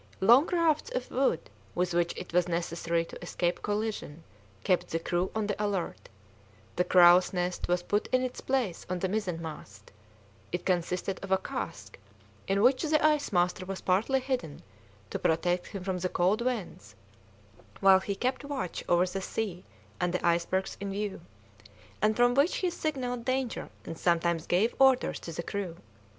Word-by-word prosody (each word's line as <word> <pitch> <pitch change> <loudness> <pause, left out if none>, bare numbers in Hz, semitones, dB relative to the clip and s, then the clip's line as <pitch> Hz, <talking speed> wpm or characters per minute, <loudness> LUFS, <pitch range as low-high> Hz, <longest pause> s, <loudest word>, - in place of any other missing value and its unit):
Long 240 - +6
rafts 335 -4 +1
of 250 - -3
wood, 260 -10 +1 0.3
with 180 0 0
which 170 0 0
it - - -8
was 180 0 +3
necessary 170 -1 -1
to - - -11
escape 175 0 -1
collision, 205 -7 -3 0.4
kept 180 -1 +2
the 165 - -1
crew 175 +2 -1
on 220 -1 0
the 205 0 -2
alert; 200 -4 -3 0.7
the 180 - +2
crow's 180 0 +6
nest 180 0 -2
was 175 0 +1
put 205 +3 0
in 255 0 +1
its 255 -1 -4
place 250 -10 -1
on 185 - -1
the 190 - -1
mizenmast; 165 - -5 0.6
it 175 - -3
consisted 180 +1 -1
of 195 - -6
a 190 - +5
cask, - - -6 0.5
in 200 +1 +2
which 255 +2 +4
the 305 -1 +2
ice 300 -1 +2
master 180 0 +1
was 190 +1 -5
partly 215 +9 +2
hidden 255 - -4 0.5
to - - -3
protect 175 +2 +1
him 195 -3 -7
from 185 -1 -2
the 185 +1 -1
cold 190 +7 +2
winds 195 - -4 0.8
while 195 -1 +7
he 200 +1 -3
kept 255 +6 -1
watch 280 -10 -4
over 175 +1 +4
the 190 +1 -4
sea 185 -3 -3 0.4
and 180 -1 0
the 180 - -2
icebergs 175 +3 0
in 200 0 -4
view, 200 0 -3 0.8
and 215 +1 +3
from 245 +1 +4
which 280 +6 +3
he 365 -2 0
signalled 255 -7 -3
danger 255 -1 -2 0.2
and 165 - -7
sometimes 170 -1 +1
gave 200 +7 +2
orders 265 -1 +4
to 165 - -7
the 170 +1 -4
crew. 185 -3 -4
190 Hz, 170 wpm, -29 LUFS, 175-240 Hz, 0.8 s, while